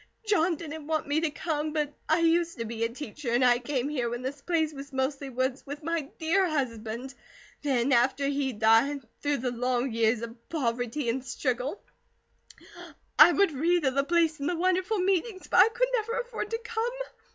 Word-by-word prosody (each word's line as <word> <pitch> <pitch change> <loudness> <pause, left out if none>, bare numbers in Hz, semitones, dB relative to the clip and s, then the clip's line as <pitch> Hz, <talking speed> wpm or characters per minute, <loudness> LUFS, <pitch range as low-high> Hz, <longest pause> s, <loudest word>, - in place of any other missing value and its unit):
"John 360 -5 +2
didn't 315 -1 -8
want 315 -2 -1
me 295 +2 +1
to 325 - +1
come. 300 0 -3
But 300 -2 -1 0.2
I 320 +2 +3
used 335 0 +2
to 230 - -3
be 230 0 -3
a 230 - +1
teacher, 255 +1 -6
and 250 +2 +4
I 245 -1 +5
came 255 +1 -2
here 255 -5 -1
when 240 +1 -5
this 275 +2 -5
place 320 -2 0
was 280 0 -9
mostly 270 +1 -2
woods, 260 +1 -2
with 290 +2 -8
my 325 -3 -2
dear 360 +4 +2
husband. 245 -3 -3 0.5
Then 270 -3 +1
after 265 +3 +3
he 280 -1 0
died, 230 +6 +3 0.2
through 290 -1 +1
the 250 0 -2
long 250 +1 0
years 225 0 +1
of 235 0 -10
poverty 245 -2 -2
and 250 +3 -1
struggle, 255 +4 -2 1.4
I 315 +3 +10
would 395 0 +3
read 330 +3 +1
of 265 - +2
the 275 +1 +2
place 325 0 +2
and 280 - -1
the 355 - 0
wonderful 370 +4 +1
meetings, 375 +1 0
but - - 0
I 395 +4 +8
could - - 0
never 460 -1 0
afford 475 -3 -4
to 455 - -1
come. 465 0 -2
285 Hz, 195 wpm, -28 LUFS, 250-335 Hz, 1.4 s, I